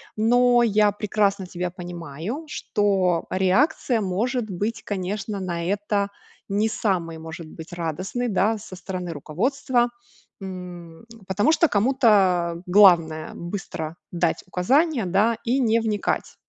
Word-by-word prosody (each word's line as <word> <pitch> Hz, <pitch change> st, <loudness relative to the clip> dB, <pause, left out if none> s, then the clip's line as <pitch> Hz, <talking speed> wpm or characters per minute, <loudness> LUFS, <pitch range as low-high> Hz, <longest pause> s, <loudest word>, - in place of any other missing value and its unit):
Но 245 Hz, +2 st, +4 dB
я 210 Hz, -2 st, +3 dB
прекрасно 200 Hz, -2 st, 0 dB
тебя 180 Hz, 0 st, -4 dB
понимаю, 175 Hz, -, -6 dB
что 190 Hz, -, 0 dB
реакция 230 Hz, -, +2 dB
может 215 Hz, +5 st, -1 dB
быть, 215 Hz, +5 st, -3 dB
конечно, 200 Hz, +1 st, -3 dB
на 170 Hz, -3 st, -3 dB
это 200 Hz, +1 st, 0 dB, 0.4 s
не 210 Hz, +3 st, +1 dB
самой, 175 Hz, -7 st, -1 dB
может 160 Hz, 0 st, -8 dB
быть, 160 Hz, +2 st, -11 dB
радостной, 185 Hz, +9 st, -3 dB
да, 210 Hz, +3 st, +2 dB
со 195 Hz, -2 st, -10 dB
стороны 180 Hz, -2 st, -5 dB
руководства. 240 Hz, -, 0 dB, 0.5 s
М, 180 Hz, -1 st, -8 dB, 0.2 s
потому 205 Hz, +9 st, +2 dB
что 330 Hz, 0 st, +4 dB
кому-то 195 Hz, -8 st, +3 dB
главное 170 Hz, -5 st, +5 dB
быстро 170 Hz, -3 st, -6 dB
дать 170 Hz, -1 st, 0 dB
указания, 260 Hz, -, +2 dB
да, 210 Hz, +6 st, +2 dB
и 250 Hz, +3 st, +1 dB
не 230 Hz, -2 st, +3 dB
вникать. 215 Hz, -2 st, -2 dB
195 Hz, 120 wpm, -24 LUFS, 175-225 Hz, 0.5 s, главное